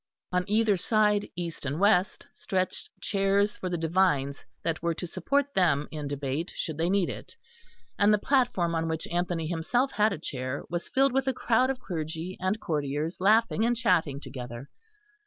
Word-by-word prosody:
On 180 0 +1
either 215 -1 +3
side, 210 +1 +2
east 170 -2 -5
and 140 +3 -2
west, 195 -1 +3
stretched 185 -1 -2
chairs 200 +1 +1
for 185 - -4
the 175 - -1
divines 160 -5 +1 0.2
that 165 -1 -1
were 170 0 0
to 180 - -4
support 280 +10 0
them 155 -6 +2
in 150 -2 -4
debate, 140 +3 -3
should 160 -3 -3
they 170 +2 +1
need 195 -2 +2
it; - - -8 0.6
and 205 +1 +5
the 210 - +5
platform 220 -9 +1
on 165 0 0
which 160 -1 -2
Anthony 175 -1 -1
himself 175 - 0
had 210 +1 +2
a 195 - -3
chair 130 -3 -4
was 175 0 -3
filled 270 0 +3
with 270 0 +1
a 265 - +2
crowd 255 +2 +2
of 265 -1 -2
clergy 165 0 -4
and 185 +4 0
courtiers 150 0 -2
laughing 220 +2 +4
and 240 +1 +2
chatting 160 - +2
together. 125 -1 -8
180 Hz, 175 wpm, -28 LUFS, 160-210 Hz, 0.6 s, and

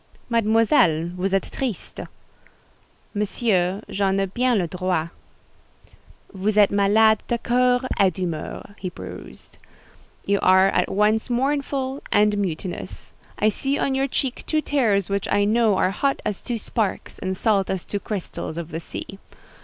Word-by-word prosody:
"Mademoiselle, 220 - +3
vous 185 +2 -1
êtes 195 -1 -1
triste." 250 -7 -4 1.1
"Monsieur, 205 -2 0
j'en 195 -1 0
ai 195 - +2
bien 245 +5 +1
le 185 - +1
droit." 180 -1 -1 1.2
"Vous 200 +2 -1
êtes 205 -2 +6
malade 210 +2 +4
de 240 - 0
coeur 250 +1 +2 0.2
et 195 -2 +6
d'humeur," 175 +2 -5
he 185 - -3
pursued. 65 - -11 0.7
"You 200 0 +2
are 190 +1 +5
at - - +1
once 215 +4 +2
mournful 270 +1 -1
and 210 0 +4
mutinous. 180 -1 -5 0.2
I 215 - +3
see 270 +6 -1
on 275 - 0
your 270 +1 +1
cheek 260 -1 -2
two 310 - +2
tears 220 -11 +1
which 200 0 -2
I 205 - +3
know 220 -2 +3
are 185 - +2
hot 275 +7 0
as 205 - -2
two 240 -2 -3
sparks, 215 -1 -3
and 190 0 -3
salt 200 -3 +1
as 190 -2 -2
two 205 - -3
crystals 195 -5 -5
of 170 -1 -5
the 160 - -3
sea. 195 +3 -8
205 Hz, 150 wpm, -23 LUFS, 190-235 Hz, 1.2 s, êtes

